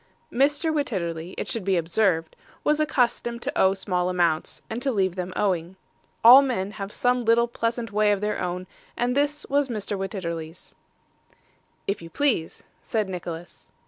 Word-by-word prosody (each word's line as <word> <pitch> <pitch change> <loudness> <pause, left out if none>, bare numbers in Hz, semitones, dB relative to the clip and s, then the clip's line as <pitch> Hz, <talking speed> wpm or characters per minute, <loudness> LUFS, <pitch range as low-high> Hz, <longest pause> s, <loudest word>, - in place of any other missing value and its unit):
Mr. 290 +5 +2
Wititterly, 180 - -2
it - - -3
should 230 - -1
be 190 -1 +2
observed, 165 -1 +1 0.3
was 300 0 +2
accustomed 245 -5 0
to - - -3
owe 190 +1 +4
small 180 -2 -1
accounts, 170 -3 0
and 225 +2 -4
to 270 - +1
leave 190 -5 +1
them 180 -1 -4
owing. 180 -2 0 0.5
All 250 +4 +11
men 230 -8 -1
have 200 -1 -6
some 245 +1 +1
little 230 +1 +4
pleasant 230 -1 -2
way 210 0 +3
of 205 - +1
their 210 +1 -2
own; 180 0 -3 0.3
and 245 +1 0
this 290 +1 0
was 285 0 +2
Mr. 210 -4 -3
Wititterly's. 170 -4 -5 1.1
'If 200 - -2
you 165 - -9
please,' 235 - 0 0.2
said 215 -3 -1
Nicholas. 175 -1 -7
205 Hz, 160 wpm, -25 LUFS, 180-240 Hz, 1.1 s, All